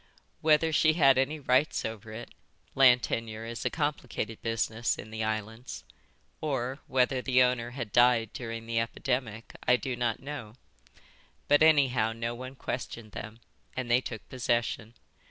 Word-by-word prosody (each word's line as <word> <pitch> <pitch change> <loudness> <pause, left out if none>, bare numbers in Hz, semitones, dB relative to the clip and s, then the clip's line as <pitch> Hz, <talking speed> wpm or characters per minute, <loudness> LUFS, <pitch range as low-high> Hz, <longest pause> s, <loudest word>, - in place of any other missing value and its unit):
Whether 155 +1 +4
she 155 +1 +4
had 135 -5 +5
any 145 +4 0
rights 130 +1 +2
over 110 0 -6
it 115 +2 -8 0.4
(land 125 -2 +6
tenure 110 -1 -3
is 115 0 -6
a - - +3
complicated 130 -7 -3
business 115 0 -1
in 110 - -9
the 110 0 -3
islands), 110 +3 -4 0.6
or 135 -2 -2
whether 130 0 +2
the 130 -1 +4
owner 125 -1 0
had 115 -5 -4
died 120 -3 +4
during 115 -2 -6
the 115 0 0
epidemic, 115 -1 -3
I 125 - +6
do 125 +2 -3
not 120 -2 -1
know, 130 -6 -7 0.9
but 145 - +5
anyhow 135 -8 +4
no 115 +1 -3
one 130 +2 -8
questioned 120 -4 -5
them, 115 +2 -8 0.4
and 125 -2 -2
they 125 +2 +5
took 110 -4 -7
possession. 120 -2 -1
120 Hz, 155 wpm, -29 LUFS, 115-130 Hz, 0.9 s, land